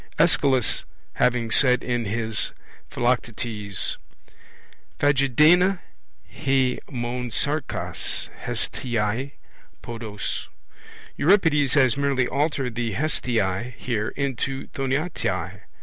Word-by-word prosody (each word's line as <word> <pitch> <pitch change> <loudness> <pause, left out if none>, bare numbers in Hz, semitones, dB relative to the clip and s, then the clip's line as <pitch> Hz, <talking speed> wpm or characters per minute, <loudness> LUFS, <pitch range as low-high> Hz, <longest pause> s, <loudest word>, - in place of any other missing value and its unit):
Aeschylus 140 - +3 0.3
having 120 -2 +1
said 125 -1 +5
in 120 -2 -1
his 110 +1 0 0.4
Philoctetes: 115 -4 -1 1.0
phagedaina 150 +7 +4 0.5
he 135 -3 0
mon 125 -1 -3
sarkas 145 +7 0 0.2
hesthiei 120 +3 -1 0.5
podos 110 -3 -5 0.7
Euripides 150 -6 +3
has 130 -3 +4
merely 140 -3 +1
altered 140 -3 -1
the 115 -2 -2
hesthiei 120 -4 -1
here 110 -4 -2
into 135 -1 -2
thoinatai. 140 +5 -2
125 Hz, 80 wpm, -24 LUFS, 115-140 Hz, 1.0 s, said